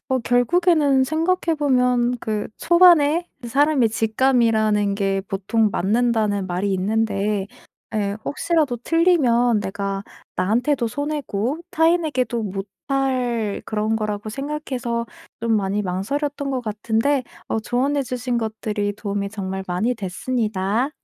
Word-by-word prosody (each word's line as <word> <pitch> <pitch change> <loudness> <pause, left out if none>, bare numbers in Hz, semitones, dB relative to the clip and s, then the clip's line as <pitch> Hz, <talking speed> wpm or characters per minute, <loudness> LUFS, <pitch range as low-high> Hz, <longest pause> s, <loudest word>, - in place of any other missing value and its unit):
뭐 260 0 +2
결국에는 285 +3 +3
생각해 330 +3 0
보면 250 -3 +2
그 215 -1 -2
초반에 345 -1 +5 0.2
사람의 275 0 +3
직감이라는 220 -3 +2
게 195 -1 0
보통 210 +2 +1
맞는다는 210 -1 +1
말이 190 +2 -1
있는데 205 0 0 0.5
예 200 -1 -1
혹시라도 305 -4 0
틀리면 245 - +3
내가 195 0 -3 0.3
'나한테도 240 +6 +1
손해고 285 -1 -2
타인에게도 310 -8 +1
못 195 -1 -4 0.2
할 250 -6 0
그런 215 +1 -1
거.'라고 210 -1 -3
생각해서 255 -3 -3 0.3
좀 230 -1 +2
많이 200 +1 0
망설였던 275 +10 -2
것 255 - -1
같은데 225 +5 0 0.2
어 225 - 0
조언해 265 +5 0
주신 245 -1 -2
것들이 215 -2 -2
도움이 200 -1 -3
정말 190 -2 -4
많이 215 +7 0
됐습니다. 215 +3 -1
235 Hz, 280 characters per minute, -22 LUFS, 205-275 Hz, 0.5 s, 초반에